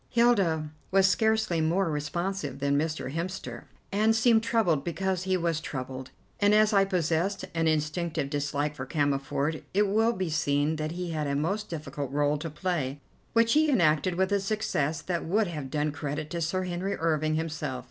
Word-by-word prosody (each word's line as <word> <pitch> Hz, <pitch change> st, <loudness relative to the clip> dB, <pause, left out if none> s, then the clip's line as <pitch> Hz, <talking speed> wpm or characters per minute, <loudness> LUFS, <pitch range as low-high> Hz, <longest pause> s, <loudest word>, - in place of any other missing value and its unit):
Hilda 195 Hz, -11 st, +2 dB, 0.2 s
was 190 Hz, 0 st, +4 dB
scarcely 220 Hz, -3 st, +2 dB
more 165 Hz, +2 st, +1 dB
responsive 150 Hz, 0 st, -3 dB
than 140 Hz, 0 st, +1 dB
Mr. 155 Hz, -2 st, -1 dB
Hemster 180 Hz, +4 st, -5 dB, 0.3 s
and 215 Hz, +2 st, +3 dB
seemed 225 Hz, 0 st, +4 dB
troubled 190 Hz, -11 st, +1 dB
because 185 Hz, +2 st, -2 dB
he 190 Hz, -1 st, +2 dB
was 165 Hz, -3 st, 0 dB
troubled, 130 Hz, -2 st, -6 dB, 0.3 s
and 205 Hz, +1 st, +4 dB
as 215 Hz, 0 st, +4 dB
I 195 Hz, -1 st, +5 dB
possessed 180 Hz, +1 st, 0 dB
an 165 Hz, -1 st, +1 dB
instinctive 155 Hz, 0 st, 0 dB
dislike 145 Hz, +1 st, -1 dB
for 130 Hz, -2 st, -7 dB
Cammerford 145 Hz, +1 st, 0 dB
it 205 Hz, +1 st, +4 dB
will 220 Hz, +4 st, +2 dB
be 185 Hz, -5 st, -3 dB
seen 150 Hz, 0 st, +1 dB
that 155 Hz, +1 st, -3 dB
he 180 Hz, -1 st, -4 dB
had 155 Hz, -2 st, -2 dB
a 140 Hz, -, -1 dB
most 195 Hz, +9 st, -1 dB
difficult 150 Hz, -4 st, -5 dB
rôle 145 Hz, +1 st, +1 dB
to 165 Hz, -, -4 dB
play, 150 Hz, -4 st, -2 dB, 0.3 s
which 230 Hz, 0 st, +4 dB
he 310 Hz, 0 st, +4 dB
enacted 170 Hz, -, +3 dB
with 190 Hz, +2 st, +1 dB
a 200 Hz, -, +3 dB
success 195 Hz, -7 st, -1 dB
that 175 Hz, -2 st, -2 dB
would 210 Hz, +6 st, +1 dB
have 150 Hz, -7 st, -5 dB
done 150 Hz, +1 st, 0 dB
credit 145 Hz, +1 st, -4 dB
to 170 Hz, -, -3 dB
Sir 185 Hz, +3 st, 0 dB
Henry 185 Hz, +2 st, -2 dB
Irving 155 Hz, -1 st, +1 dB
himself. 155 Hz, -5 st, -3 dB
165 Hz, 180 wpm, -28 LUFS, 150-195 Hz, 0.3 s, I